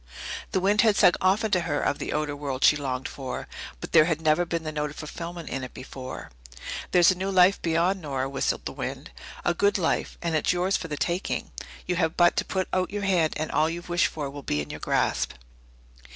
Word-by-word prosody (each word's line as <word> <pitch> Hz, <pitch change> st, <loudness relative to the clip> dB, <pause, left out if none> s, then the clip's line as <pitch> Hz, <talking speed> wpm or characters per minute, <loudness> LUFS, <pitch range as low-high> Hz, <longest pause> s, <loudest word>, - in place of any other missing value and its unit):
The -, -, +1 dB
wind 205 Hz, +3 st, +3 dB
had 220 Hz, -3 st, +4 dB
sung 180 Hz, -, +6 dB
often 200 Hz, +4 st, +2 dB
to 185 Hz, -, +4 dB
her 145 Hz, -4 st, -1 dB
of -, -, 0 dB
the -, -, -3 dB
outer 150 Hz, -1 st, -1 dB
world 140 Hz, -2 st, -3 dB
she -, -, +7 dB
longed 135 Hz, -3 st, -3 dB
for, 130 Hz, -2 st, -6 dB, 0.3 s
but -, -, -7 dB
there 155 Hz, -, +7 dB
had 165 Hz, -2 st, 0 dB
never 160 Hz, +2 st, +2 dB
been 165 Hz, -1 st, -2 dB
the 155 Hz, -, -3 dB
note 150 Hz, -1 st, -2 dB
of 145 Hz, -, -11 dB
fulfilment 170 Hz, +2 st, -7 dB
in 135 Hz, -, -3 dB
it 125 Hz, -, -8 dB
before. 130 Hz, 0 st, -8 dB, 0.6 s
There's 175 Hz, 0 st, +6 dB
a -, -, -1 dB
new 190 Hz, +2 st, -2 dB
life 185 Hz, 0 st, +5 dB
beyond, 170 Hz, +3 st, +1 dB
Nora, 135 Hz, -4 st, -2 dB
whistled 135 Hz, -1 st, -1 dB
the -, -, -3 dB
wind. -, -, -6 dB, 0.3 s
A 175 Hz, -, +3 dB
good 200 Hz, +4 st, +2 dB
life 170 Hz, -4 st, -1 dB
and 170 Hz, -1 st, -2 dB
it's 155 Hz, +3 st, +2 dB
yours 180 Hz, +2 st, +1 dB
for 165 Hz, -, -2 dB
the 150 Hz, -2 st, -4 dB
taking. 175 Hz, +5 st, -2 dB, 0.3 s
You 180 Hz, -1 st, -1 dB
have 160 Hz, -2 st, 0 dB
but 175 Hz, -1 st, +5 dB
to -, -, +2 dB
put 190 Hz, -1 st, -1 dB
out 185 Hz, 0 st, +1 dB
your 205 Hz, 0 st, -4 dB
hand 180 Hz, -5 st, +2 dB
and 155 Hz, -, -3 dB
all 155 Hz, +1 st, +2 dB
you've 175 Hz, +1 st, -6 dB
wished 175 Hz, +1 st, +3 dB
for 150 Hz, -3 st, -4 dB
will 140 Hz, +1 st, -7 dB
be 75 Hz, -, -1 dB
in 75 Hz, -, -4 dB
your -, -, -7 dB
grasp. -, -, 0 dB
165 Hz, 230 wpm, -26 LUFS, 150-185 Hz, 0.6 s, she